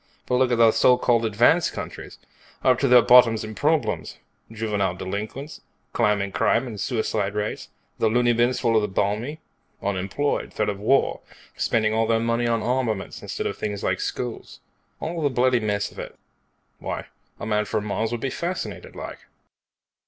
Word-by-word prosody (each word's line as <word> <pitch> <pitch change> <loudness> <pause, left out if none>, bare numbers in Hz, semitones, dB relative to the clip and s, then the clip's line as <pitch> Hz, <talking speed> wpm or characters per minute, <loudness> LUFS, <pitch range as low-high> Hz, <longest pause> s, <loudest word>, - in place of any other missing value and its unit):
But 125 - +1
look 130 -1 +2
at 120 - +2
the 115 -1 +6
so 125 +2 +4
called 115 -2 +2
advanced 120 +11 +3
countries. - - -7 0.5
Up 130 -2 +4
to 140 - +2
their 125 -1 +7
bottoms 120 -3 +6
in 110 0 -6
problems. 150 +6 0 0.3
Juvenile 105 -5 -1
delinquents, 105 - -6 0.3
climbing 100 -2 +1
crime 115 +5 +2
and 110 -6 -6
suicide 105 -3 -1
rates, 105 0 -3 0.3
the 110 - +3
loony 120 +1 +3
bins 120 +2 +2
full 115 -2 +1
of 110 - +5
the 105 - -1
balmy, 105 +10 -2 0.4
unemployed, 100 +9 -2
threat 105 - 0
of 100 -1 -4
war, 135 +7 +2 0.4
spending 110 -2 +1
all 110 0 +1
their 115 0 +2
money 115 +1 0
on 115 -1 0
armaments 120 -5 -2
instead - - -4
of - - -3
things 105 -1 -3
like - - 0
schools. - - -5 0.4
All 165 +1 -4
the 145 - +2
bloody 125 -1 +2
mess 105 -2 -1
of - - -12
it. - - -8 0.6
Why, - - -4 0.3
a - - -5
man 105 -1 +1
from 105 +1 -2
Mars 110 +2 -1
would 120 -1 -3
be 135 - -2
fascinated, 175 +6 -5
like." - - -7
115 Hz, 175 wpm, -24 LUFS, 105-125 Hz, 0.6 s, their